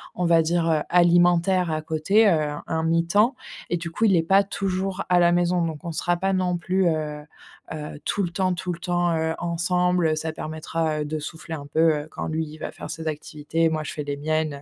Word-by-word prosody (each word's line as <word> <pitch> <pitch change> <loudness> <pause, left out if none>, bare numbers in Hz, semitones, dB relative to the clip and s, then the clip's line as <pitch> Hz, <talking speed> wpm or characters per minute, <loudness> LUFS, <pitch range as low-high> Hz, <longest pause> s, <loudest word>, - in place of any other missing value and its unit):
on 180 - -1
va 165 -1 +5
dire, 165 +1 +1
heu, 155 -1 +2
alimentaire 175 0 +4
à 155 0 -1
côté. 180 +8 +2
Heu, 155 -3 +1 0.2
un 160 0 -1
mi-temps 170 +9 +2 0.4
et 175 - 0
du 170 0 -6
coup, 225 - -3
il 195 -4 +4
est 165 - +2
pas 195 +4 +4
toujours 195 -1 -2
à 180 -1 +4
la 175 0 +5
maison 175 0 +2
donc 160 +1 -6
on 170 - -3
sera 175 +2 0
pas 195 +2 0
non 180 -1 0
plus, 185 +2 0
heu, 150 -2 -2 0.5
heu, 150 -1 -7
tout 200 - 0
le 175 - -1
temps 185 +1 0
tout 180 0 -3
le 170 - -9
temps, 175 -2 0
heu, 160 0 0
ensemble. 180 0 +1
Heu, 155 - +1
ça 160 +1 -3
permettra, 155 0 -3
heu, - - -2
de 155 +1 -3
souffler 160 +2 -6
un 145 -2 -8
peu, 155 +2 -2 0.2
heu, 150 - -13
quand - - -5
lui, 160 0 -2
il 155 +1 -11
va - - -6
faire - - -9
ses 160 0 -5
activités, 155 +2 -1
moi, 155 -1 -2
je - - -5
fais 150 - -4
les 145 0 -4
miennes, 155 0 -1
heu 140 - -11
165 Hz, 240 wpm, -24 LUFS, 155-180 Hz, 0.5 s, va